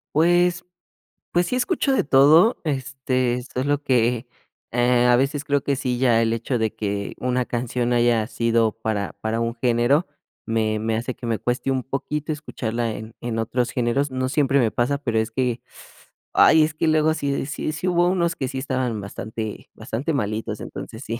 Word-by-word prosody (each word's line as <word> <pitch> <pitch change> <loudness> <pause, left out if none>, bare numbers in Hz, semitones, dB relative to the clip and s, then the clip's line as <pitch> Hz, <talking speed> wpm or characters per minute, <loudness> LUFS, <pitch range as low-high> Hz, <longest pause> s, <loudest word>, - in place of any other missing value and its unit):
Pues, 175 +2 +3 0.7
pues 175 0 +2
sí 250 - -2
escucho 275 +1 +1
de - - +2
todo, 155 - +5
este, 130 -4 -1
solo 145 +3 0
que, 120 -2 +1 0.5
eh, 120 0 +3
a 125 0 +5
veces 135 +3 0
creo 145 -1 +1
que 140 - 0
sí 125 -2 -2
ya 120 -3 +4
el 115 0 +2
hecho 120 +2 -2
de 110 -1 -1
que 100 -2 -3
una 125 0 0
canción 120 0 -1
haya 120 -2 +3
sido 115 -1 +1
para 110 -3 -3
para 110 +1 -1
un 115 0 -1
género, 120 +6 +2 0.4
me 110 -1 0
me 110 +1 -1
hace 120 +3 -3
que 120 - -8
me 115 -2 0
cueste 125 +2 -2
un 130 -2 0
poquito 145 +3 -3
escucharla 120 -6 -3
en 110 +1 -8
en 120 -1 -3
otros 120 +2 -1
géneros. 125 +4 0
No 130 0 -2
siempre 140 -1 +2
me 120 -5 +3
pasa, 125 +4 0
pero 115 -6 -1
es 110 - -1
que, 125 0 -1 0.7
ay, 160 - +6
es 155 0 -1
que 160 - -1
luego 155 0 +3
sí 140 -3 -2
sí 155 +1 -3
sí 180 +4 -2
hubo 175 0 +3
unos 170 -2 0
que 130 - -2
sí 135 - -5
estaban 130 -5 -2
bastante 110 +2 -6
bastante 135 +9 -3
malitos, 110 -4 -2
entonces 110 +4 -8
sí, 115 +1 -4
125 Hz, 185 wpm, -23 LUFS, 115-145 Hz, 0.7 s, ay